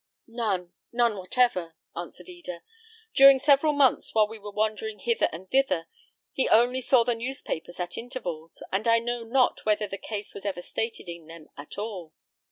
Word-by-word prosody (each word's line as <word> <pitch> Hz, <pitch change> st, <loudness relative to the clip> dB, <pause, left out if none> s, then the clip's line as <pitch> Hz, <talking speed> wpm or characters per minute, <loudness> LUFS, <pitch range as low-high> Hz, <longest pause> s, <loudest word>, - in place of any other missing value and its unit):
"None, 205 Hz, -7 st, -2 dB, 0.2 s
none 235 Hz, -2 st, +2 dB
whatever," 185 Hz, -4 st, 0 dB, 0.2 s
answered 175 Hz, -, -7 dB
Eda. 345 Hz, -, -8 dB, 0.5 s
"During 275 Hz, 0 st, +9 dB
several 285 Hz, +2 st, +4 dB
months, 280 Hz, -5 st, +2 dB
while 215 Hz, -1 st, +5 dB
we 220 Hz, +1 st, -10 dB
were 205 Hz, 0 st, -8 dB
wandering 215 Hz, +1 st, -1 dB
hither 235 Hz, -1 st, +1 dB
and 175 Hz, +4 st, -9 dB
thither, 270 Hz, -, +2 dB, 0.5 s
he 265 Hz, -, +1 dB
only 245 Hz, +3 st, +4 dB
saw 250 Hz, -1 st, +4 dB
the 240 Hz, +1 st, +1 dB
newspapers 230 Hz, -, -5 dB
at 175 Hz, -1 st, -3 dB
intervals, 180 Hz, -10 st, -6 dB
and 200 Hz, +4 st, 0 dB
I 230 Hz, 0 st, +6 dB
know 240 Hz, 0 st, -2 dB
not 245 Hz, +2 st, +2 dB
whether 210 Hz, 0 st, +1 dB
the 195 Hz, 0 st, -6 dB
case 210 Hz, -2 st, -6 dB
was 200 Hz, -, -9 dB
ever 190 Hz, -3 st, -3 dB
stated 225 Hz, -1 st, -4 dB
in 170 Hz, -2 st, -8 dB
them 165 Hz, -1 st, -12 dB
at 145 Hz, +1 st, -9 dB
all." 195 Hz, -7 st, -5 dB
220 Hz, 175 wpm, -27 LUFS, 180-245 Hz, 0.5 s, During